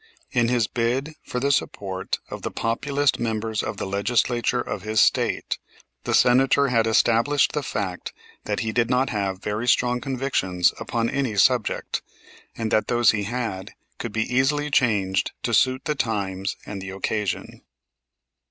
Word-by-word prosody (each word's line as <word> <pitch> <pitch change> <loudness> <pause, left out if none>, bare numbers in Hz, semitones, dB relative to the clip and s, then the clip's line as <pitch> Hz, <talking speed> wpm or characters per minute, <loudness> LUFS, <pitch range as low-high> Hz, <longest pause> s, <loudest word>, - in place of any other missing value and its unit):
In 120 -2 +2
his 120 -2 +2
bid 125 +7 -1
for 125 - -3
the 140 +2 +1
support 95 -8 -2
of - - -6
the - - -3
Populist 140 +5 0
members 110 -1 -1
of 110 - -4
the - - -3
Legislature 120 +5 +1
of 105 - -4
his 110 +2 0
State - - +2 0.5
the - - +2
Senator 135 +3 +4
had 115 -2 +2
established 120 +5 +3
the 150 - -1
fact 100 -8 -4 0.3
that 105 -1 -1
he 110 -1 -1
did 120 0 +1
not 130 +2 +2
have 100 -3 -2
very 105 +3 -2
strong 125 0 +2
convictions 125 -10 0
upon 115 -1 -1
any 130 -4 -1
subject, 120 +2 +2 0.6
and 115 -1 -2
that 110 - +2
those 120 -1 +4
he 105 -2 -2
had 110 -4 -4 0.3
could 120 - -4
be 110 +1 0
easily 145 +4 +1
changed 100 -8 +1
to - - -1
suit 130 +3 +3
the 150 - +1
times 100 -7 -2
and 100 -2 -6
the 95 - -6
occasion. 95 +1 -3
115 Hz, 160 wpm, -24 LUFS, 105-125 Hz, 0.6 s, Senator